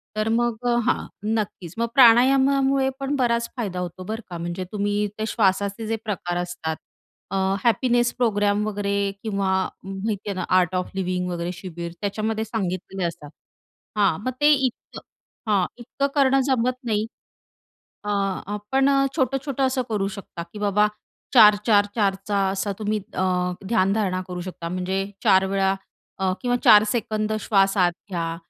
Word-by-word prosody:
तर 215 Hz, +1 st, 0 dB
मग 235 Hz, +1 st, +1 dB
अ, 240 Hz, -, +3 dB
हां. -, -, +1 dB, 0.3 s
नक्कीच. 195 Hz, -6 st, -3 dB
मग 235 Hz, 0 st, 0 dB
प्राणायामामुळे 265 Hz, +2 st, +5 dB
पण 275 Hz, +1 st, -1 dB
बराच 235 Hz, -3 st, +1 dB
फायदा 195 Hz, -7 st, -3 dB
होतो, 180 Hz, 0 st, -5 dB
बरं 220 Hz, +4 st, -4 dB
का. 175 Hz, -, -5 dB
म्हणजे 175 Hz, +2 st, -4 dB
तुम्ही 205 Hz, 0 st, 0 dB
ते 215 Hz, -, 0 dB
श्वासाचे 200 Hz, 0 st, 0 dB
जे 225 Hz, -, 0 dB
प्रकार 180 Hz, -4 st, -2 dB
असतात. 175 Hz, -2 st, -3 dB, 0.6 s
अ, -, -, -2 dB, 0.3 s
हॅपीनेस 240 Hz, 0 st, +2 dB
प्रोग्राम 205 Hz, -3 st, +1 dB
वगैरे 200 Hz, -1 st, -2 dB, 0.3 s
किंवा 200 Hz, -3 st, -1 dB, 0.3 s
माहिती 200 Hz, +1 st, -4 dB
आहे 200 Hz, -, -2 dB
ना 185 Hz, -, -3 dB
आर्ट 180 Hz, 0 st, 0 dB
ऑफ 180 Hz, 0 st, -1 dB
लिव्हिंग 180 Hz, -1 st, -1 dB
वगैरे 170 Hz, 0 st, -3 dB
शिबीर 170 Hz, -2 st, -7 dB
त्याच्यामध्ये 215 Hz, +2 st, -2 dB
सांगितलेले 190 Hz, -3 st, -3 dB
असतात. 165 Hz, -3 st, -8 dB, 0.7 s
हां. 195 Hz, -6 st, +3 dB
मग 255 Hz, -, 0 dB
ते 295 Hz, +1 st, +6 dB
इतकं 265 Hz, -4 st, -2 dB, 0.5 s
हां. 195 Hz, -3 st, +3 dB
इतकं 255 Hz, +3 st, -2 dB
करणं 270 Hz, -1 st, +4 dB
जमत 255 Hz, -1 st, +1 dB
नाही. 215 Hz, -2 st, 0 dB, 1.0 s
अ, -, -, -5 dB, 0.5 s
आपण 265 Hz, +7 st, +1 dB
अ, 275 Hz, 0 st, +3 dB
छोटं-छोटं 270 Hz, 0 st, 0 dB
असं 260 Hz, 0 st, 0 dB
करू 200 Hz, -3 st, 0 dB
शकता 175 Hz, -3 st, -8 dB
की 210 Hz, -, -8 dB
बाबा 210 Hz, 0 st, +3 dB, 0.5 s
4-4 210 Hz, -2 st, +6 dB
4 200 Hz, -3 st, +2 dB
चा 205 Hz, -1 st, +1 dB
असा 195 Hz, +1 st, -2 dB
तुम्ही 215 Hz, 0 st, -1 dB, 0.2 s
अ, -, -, -1 dB, 0.5 s
ध्यानधारणा 195 Hz, -3 st, +1 dB
करू 180 Hz, -1 st, -5 dB
शकता. 175 Hz, -2 st, -6 dB
म्हणजे 185 Hz, +2 st, -2 dB, 0.2 s
4 190 Hz, 0 st, +5 dB
वेळा 195 Hz, 0 st, +1 dB, 0.4 s
अ, 190 Hz, -1 st, +1 dB
किंवा 245 Hz, -1 st, +1 dB
4 210 Hz, 0 st, +8 dB
सेकंद 215 Hz, -2 st, -1 dB
श्वास 195 Hz, -1 st, +2 dB
आत 175 Hz, -2 st, +4 dB, 0.2 s
घ्या 165 Hz, -2 st, -2 dB
205 Hz, 155 wpm, -23 LUFS, 190-235 Hz, 1.0 s, 4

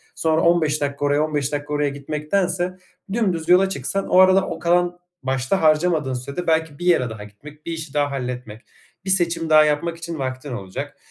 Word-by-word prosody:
sonra 160 Hz, 0 st, +1 dB
15 160 Hz, -3 st, +2 dB
dakika 145 Hz, 0 st, -2 dB
oraya 145 Hz, +1 st, +2 dB
15 145 Hz, -3 st, -1 dB
dakika 145 Hz, 0 st, -4 dB
oraya 145 Hz, -1 st, +1 dB
gitmektense 175 Hz, +6 st, -2 dB, 0.4 s
dümdüz 185 Hz, -8 st, -1 dB
yola 185 Hz, +2 st, +5 dB
çıksan 195 Hz, +4 st, -2 dB
o 185 Hz, -, +4 dB
arada 190 Hz, 0 st, +5 dB
o -, -, -5 dB
kalan, 175 Hz, +1 st, +1 dB, 0.2 s
başta 130 Hz, +7 st, 0 dB
harcamadığın 155 Hz, -3 st, +2 dB
sürede 140 Hz, +7 st, -5 dB
belki 160 Hz, -2 st, 0 dB
bir 175 Hz, -, -5 dB
yere 165 Hz, -9 st, +3 dB
daha 110 Hz, -2 st, -8 dB
gitmek, 145 Hz, +9 st, -14 dB
bir 170 Hz, -, -4 dB
işi 160 Hz, -3 st, -6 dB
daha 145 Hz, -1 st, +1 dB
halletmek, 125 Hz, -4 st, -5 dB, 0.4 s
bir -, -, -4 dB
seçim 170 Hz, -3 st, +1 dB
daha 155 Hz, -1 st, +7 dB
yapmak 150 Hz, +3 st, -1 dB
için 165 Hz, -1 st, -6 dB
vaktin 130 Hz, +1 st, -4 dB
olacak. 95 Hz, -5 st, -6 dB
155 Hz, 185 wpm, -22 LUFS, 140-175 Hz, 0.4 s, daha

